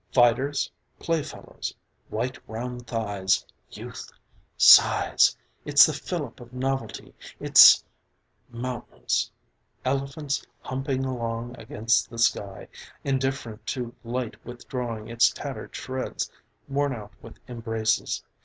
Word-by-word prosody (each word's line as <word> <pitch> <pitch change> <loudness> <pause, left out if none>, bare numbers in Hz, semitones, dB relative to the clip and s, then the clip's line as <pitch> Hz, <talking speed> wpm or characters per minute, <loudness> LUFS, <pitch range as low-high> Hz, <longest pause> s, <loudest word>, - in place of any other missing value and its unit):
Fighters. 130 +3 +3 0.3
Playfellows. 165 -3 -4 0.3
White 125 +4 -3
round 120 +2 -6
thighs! 100 -4 0 0.2
Youth! - - -9 0.5
Sighs! - - +6 0.3
It's - - +7
the - - -1
fillip - - -5
of 120 0 -13
novelty. 135 +1 -3 0.3
It's - - +8 0.6
Mountains. 120 0 -3 0.6
Elephants 140 +2 -1 0.2
humping 135 0 -2
along 120 -1 -3
against 110 +1 +1
the 115 - -10
sky 100 -4 0 0.4
indifferent 130 -5 -2
to 120 +1 -3
light 120 0 -4
withdrawing 120 -2 -5
its 115 0 +4
tattered - - -7
shreds, 130 0 -4 0.4
worn 140 0 0
out 105 -2 -10
with 115 - -12
embraces. 115 - -1
120 Hz, 100 wpm, -26 LUFS, 115-130 Hz, 0.6 s, It's